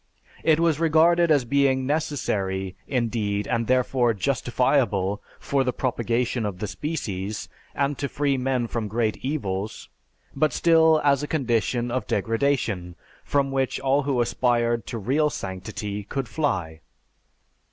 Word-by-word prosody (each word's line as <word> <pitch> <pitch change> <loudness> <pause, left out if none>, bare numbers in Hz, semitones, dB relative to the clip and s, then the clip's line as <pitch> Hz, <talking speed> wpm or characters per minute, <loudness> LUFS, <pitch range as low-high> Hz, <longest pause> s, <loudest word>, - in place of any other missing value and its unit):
It 160 -1 +4
was 165 -3 +2
regarded 165 +1 +4
as 145 -5 +3
being 135 0 +2
necessary, 100 - -1
indeed, 110 -5 -1
and 115 -2 0
therefore 125 -2 +2
justifiable, 120 -4 +1 0.2
for 140 -1 0
the 125 - 0
propagation 120 -1 -1
of 100 -3 -3
the 105 - -3
species, 105 - -4 0.3
and 140 -1 0
to 140 - -2
free 140 -1 0
men 130 -1 0
from 115 -2 -3
great 110 +1 0
evils; 105 -8 -4 0.5
but 150 -1 +2
still 160 -2 +5
as 140 -1 +3
a 150 - -3
condition 120 -4 0
of 130 +1 -2
degradation 115 -7 0 0.3
from 140 -1 0
which 130 -1 0
all 135 +2 +2
who 135 -3 0
aspired 120 -1 +1
to 115 - -4
real 135 +8 +1
sanctity 100 -1 -5
could 135 +5 -4
fly. 95 - -2
125 Hz, 135 wpm, -24 LUFS, 110-140 Hz, 0.5 s, still